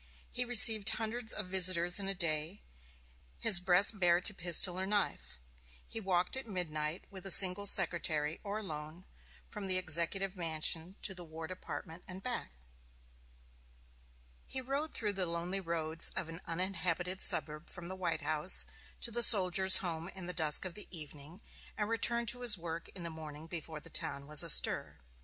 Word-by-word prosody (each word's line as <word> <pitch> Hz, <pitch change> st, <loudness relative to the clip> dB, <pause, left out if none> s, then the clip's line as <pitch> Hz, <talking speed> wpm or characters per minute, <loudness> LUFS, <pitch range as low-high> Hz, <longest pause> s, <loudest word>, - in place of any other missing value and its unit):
He 250 Hz, -, +1 dB
received 225 Hz, -3 st, +6 dB
hundreds 225 Hz, +1 st, -3 dB
of 210 Hz, -, -5 dB
visitors 180 Hz, -1 st, +3 dB
in 195 Hz, -, -6 dB
a 195 Hz, -, -3 dB
day, 165 Hz, +1 st, -3 dB, 0.7 s
his 175 Hz, -, +3 dB
breast 190 Hz, +3 st, +2 dB
bare 175 Hz, -1 st, +2 dB
to 205 Hz, +3 st, +2 dB
pistol 175 Hz, 0 st, +3 dB
or 190 Hz, -, -4 dB
knife. 205 Hz, -, -4 dB, 0.5 s
He 225 Hz, -, -3 dB
walked 185 Hz, -1 st, -1 dB
at 265 Hz, -2 st, -7 dB
midnight, 160 Hz, -4 st, -5 dB
with 190 Hz, -2 st, -11 dB
a 195 Hz, -, -6 dB
single 190 Hz, +2 st, +10 dB
secretary, 165 Hz, -5 st, +1 dB
or 205 Hz, 0 st, -5 dB
alone, 160 Hz, -3 st, -9 dB, 0.4 s
from 210 Hz, -3 st, -8 dB
the 185 Hz, -1 st, 0 dB
Executive 185 Hz, +3 st, -1 dB
Mansion 165 Hz, +1 st, -3 dB
to 190 Hz, -, -2 dB
the 180 Hz, -2 st, -9 dB
War 160 Hz, 0 st, -10 dB
Department 170 Hz, -1 st, -9 dB
and 185 Hz, +1 st, -11 dB
back. 245 Hz, -1 st, -5 dB, 2.0 s
He 265 Hz, -, -4 dB
rode 275 Hz, +4 st, -5 dB
through 210 Hz, -3 st, -4 dB
the 190 Hz, -2 st, -3 dB
lonely 170 Hz, +3 st, -5 dB
roads 165 Hz, -2 st, -2 dB
of 165 Hz, -, -5 dB
an 165 Hz, +1 st, -10 dB
uninhabited 180 Hz, +1 st, -4 dB
suburb 150 Hz, +1 st, +2 dB
from 175 Hz, -2 st, -10 dB
the 190 Hz, -, -8 dB
White 170 Hz, -4 st, -4 dB
House 155 Hz, +3 st, -1 dB, 0.4 s
to 235 Hz, -, -4 dB
the 240 Hz, +1 st, -1 dB
Soldiers' 190 Hz, -4 st, +7 dB
Home 165 Hz, -1 st, -5 dB
in 190 Hz, -2 st, -10 dB
the 180 Hz, -, -7 dB
dusk 155 Hz, 0 st, 0 dB
of 185 Hz, -, -7 dB
the 210 Hz, -, -10 dB
evening, 155 Hz, +1 st, -12 dB, 0.4 s
and 210 Hz, -, -3 dB
returned 235 Hz, +1 st, -1 dB
to 245 Hz, +1 st, -4 dB
his 235 Hz, -4 st, +3 dB
work 165 Hz, -1 st, -8 dB
in 180 Hz, -, -7 dB
the 170 Hz, -, -7 dB
morning 155 Hz, -1 st, -11 dB
before 165 Hz, -2 st, -8 dB
the -, -, -17 dB
town 140 Hz, 0 st, -4 dB
was 150 Hz, 0 st, +3 dB
astir. -, -, +1 dB
180 Hz, 170 wpm, -32 LUFS, 165-195 Hz, 2.0 s, single